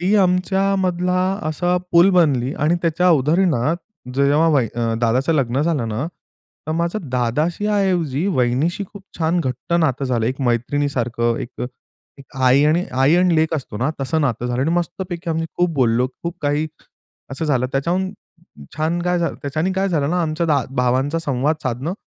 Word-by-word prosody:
ती 185 +4 +2
आमच्यामधला 185 -1 +1 0.3
असा 175 +3 0 0.2
पूल 170 +3 +6
बनली 145 -8 +2
आणि 155 +4 +1
त्याच्या 170 +2 +2
उदाहरणात 155 -1 +2 0.4
जेव्हा 140 +4 +3
वही 135 -8 +2 0.3
दादाचं 125 +6 +2
लग्न 135 -2 +1
झालं 150 -8 0
ना, 110 +8 -2 0.6
तर 155 - -1
माझं 170 +1 -2
दादाशी 145 - 0
ऐवजी 175 -6 0
वहिनीशी 145 +4 0
खूप 200 -2 -11 0.2
छान 165 +2 +1
घट्ट 130 +2 -4
नातं 140 -3 +1
झालं, 120 -4 0
एक 130 +3 -3
मैत्रिणीसारखं, 120 -2 0
एक 130 -1 -7 0.6
एक 135 0 -15
आई 130 +3 +5
आणि 160 +4 +2
आई 135 +4 +3
आणि 180 -1 +3
लेक 160 +1 +2
असतो 135 -8 -5
ना, 130 +5 0
तसं 160 +4 0
नातं 125 -4 -1
झालं 125 0 -1
आणि 160 - 0
मस्तपैकी 175 0 -3
आम्ही 165 0 -1
खूप 175 0 +2
बोललो. 125 -1 +2 0.2
खूप 170 0 -4
काही 145 +2 +1 0.7
असं 135 +4 -3
झालं 130 -5 +1
त्याच्याहून 175 +7 0 0.7
छान 160 +3 0
काय 180 0 +1
झालं 165 -4 -1
त्याच्याने 155 +6 -1
काय 190 +1 0
झालं 150 -5 0
ना, 180 +1 +1
आमच्या 155 -3 +1
भावांचा 130 +5 +1
संवाद 145 0 0
साधणं 130 +6 -2
155 Hz, 160 wpm, -20 LUFS, 130-175 Hz, 0.7 s, पूल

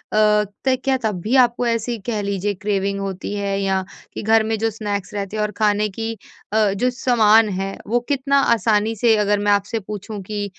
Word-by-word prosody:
त 210 +4 +2
क्या 270 -1 +2
तब 210 -5 -1
भी 225 +8 0
आपको 245 -1 +3
ऐसे 230 +1 -1
कह 220 -3 -2
लीजिए 200 0 -2
क्रेविंग 200 0 -2
होती 195 0 -4
है 200 -1 -2
या 190 -1 0 0.3
कि - - -5
घर 220 +1 +4
में 220 0 -1
जो 225 +1 +1
स्नैक्स 205 -3 -4
रहते 200 0 -4
हैं - - 0
और 210 - -2
खाने 210 -1 +2
की 225 +3 -4 0.4
अ, 215 -2 +3
जो 245 +6 +1
सामान 225 -4 +4
है 195 0 -3
वो 240 +3 +2
कितना 280 0 +2
आसानी 220 0 +1
से 225 +1 +3
अगर 205 0 +1
मैं 205 0 +1
आपसे 205 +3 0
पूछूँ 205 +1 -7
कि 205 +1 -4
210 Hz, 200 wpm, -20 LUFS, 200-225 Hz, 0.4 s, घर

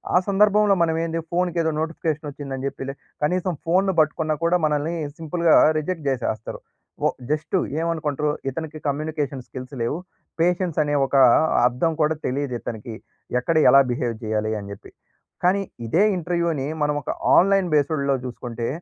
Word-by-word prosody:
ఆ - - +8
సందర్భంలో 205 +1 +4
మనం 160 -1 +1
ఏంది 165 0 -2
ఫోన్‌కి 175 0 0
ఏదో 160 -1 +1
నోటిఫికేషన్ 160 -1 -3
వచ్చిందని 135 -2 -6
చెప్పిలె 135 0 -5 0.3
కనీసం 180 +3 0
ఫోన్‌ని 190 +3 +2
పట్టుకున్నా 155 0 +1
కూడా 175 +1 +3
మనల్ని 150 +2 0 0.2
సింపుల్‌గా 165 +1 +2 0.2
రిజెక్ట్ 160 0 -4
జేసేస్తారు. 120 -4 -2 0.5
ఒ - - +3 0.2
జస్టు 155 +4 0 0.2
ఏమనుకుంటరు 155 -3 -1 0.2
ఇతనికి 155 +2 -6
కమ్యూనికేషన్ 145 -2 -2
స్కిల్స్ 130 +1 -9
లేవు. 120 +7 -1 0.4
పేషెన్స్ 175 -1 +1
అనే 145 - -2
ఒక 135 - -3 0.5
అర్థం 125 +7 0
కూడా 155 +1 +2
తెలీదు 135 0 -2
ఇతనికి. 110 0 -6 0.4
ఎక్కడ 165 +6 -1
ఎలా 135 +2 +8
బిహేవ్ 120 -1 -1
జేయాలి 110 0 -1
అని 100 - -9
జెప్పి. 100 - -11 0.5
కానీ 185 +3 +3 0.3
ఇదే 170 - +3
ఇంటర్‌వ్యూని 170 -5 -1 0.2
మనం 150 0 +1
ఒక - - -3 0.2
ఆన్‌లైన్ 195 0 +4
బేస్డ్‌లో 140 -2 +2
జూసుకుంటే, 120 -1 -5
155 Hz, 145 wpm, -23 LUFS, 135-170 Hz, 0.5 s, ఆ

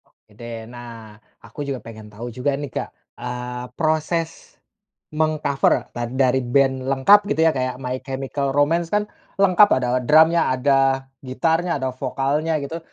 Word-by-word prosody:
Oke - - -34
deh, 115 +1 -8
nah, 115 -3 -11 0.3
aku 115 +5 -14
juga 135 -2 -3
pengen 110 -2 -10
tahu 115 +4 -8
juga 130 +4 -1
nih 145 -1 -6
Kak, - - -3 0.3
eee, 125 0 -5
proses 160 +1 -2 0.6
meng-cover 155 -3 +1
ta 120 0 -3
dari 130 +1 +1
band 130 +1 +1
lengkap 135 +10 +6
gitu 160 - 0
ya 165 - +5
kayak 130 -1 -2
My 130 0 -3
Chemical 135 +1 -3
Romance 165 +4 +2
kan, 210 +2 +1 0.3
lengkap 200 +1 +5
ada 125 -1 -1
drumnya, 160 +6 +4
ada 135 0 +2 0.2
gitarnya, 165 +6 0
ada 130 -1 -2
vokalnya 145 +5 -1
gitu, 160 +4 -5
135 Hz, 150 wpm, -21 LUFS, 125-155 Hz, 0.6 s, lengkap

